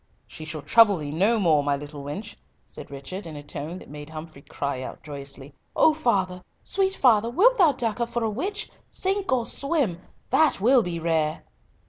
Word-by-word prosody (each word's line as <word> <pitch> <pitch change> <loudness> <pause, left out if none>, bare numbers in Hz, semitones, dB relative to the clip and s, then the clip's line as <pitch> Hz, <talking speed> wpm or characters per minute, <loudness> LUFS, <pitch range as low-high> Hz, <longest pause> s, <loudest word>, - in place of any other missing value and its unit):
"She 155 - -9
shall 155 -1 -5
trouble 205 - +6
thee 145 -2 -5
no 200 +9 +2
more, 160 -7 +3
my 140 0 +1
little 145 0 -8
wench," 195 +9 -6 0.3
said - - -11
Richard 145 +7 -7
in 155 - -8
a 145 - -8
tone 150 +4 -6
that - - -12
made 150 +1 -9
Humfrey 155 -2 -9
cry 140 -2 -4
out 130 - -8
joyously, 140 -1 -9 0.2
"O 315 - +5
father! 195 - 0 0.2
sweet 385 0 0
father! 230 -3 +4
wilt 435 - +4
thou 330 -6 +6
duck 230 -3 -2
her 235 - 0
for 235 0 -2
a 225 - +1
witch? 395 - -3 0.2
Sink 390 +1 -1
or 250 -3 +2
swim! 275 - 0 0.3
that 315 -8 +4
will 245 +5 +5
be 175 -5 -3
rare!" 160 -2 0
185 Hz, 190 wpm, -25 LUFS, 150-245 Hz, 0.3 s, trouble